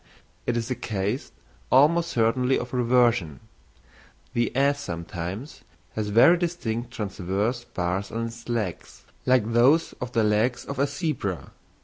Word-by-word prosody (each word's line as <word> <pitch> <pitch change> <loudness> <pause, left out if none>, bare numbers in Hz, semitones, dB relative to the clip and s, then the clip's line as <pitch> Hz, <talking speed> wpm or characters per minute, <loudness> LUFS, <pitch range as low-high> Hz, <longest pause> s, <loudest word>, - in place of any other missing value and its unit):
It 120 - +1
is 115 +2 -3
a - - +1
case 105 +1 -3 0.4
almost 165 +6 +5
certainly 125 +1 +2
of 125 +1 -5
reversion. 120 - +2 0.9
The 120 0 +1
ass 140 +1 +2
sometimes 90 - -6 0.3
has 110 -1 -2
very 120 +12 +6
distinct 125 -10 -2
transverse 105 +1 -2
bars 90 +2 -2
on 115 +1 -2
its 115 +1 -9
legs, 110 -7 -4 0.2
like 120 -3 +3
those 135 +8 +4
on 125 - -3
the 115 -2 +2
legs 110 +4 +1
of 140 - -5
a 140 - +3
zebra. 140 - -3
120 Hz, 135 wpm, -25 LUFS, 105-130 Hz, 0.9 s, very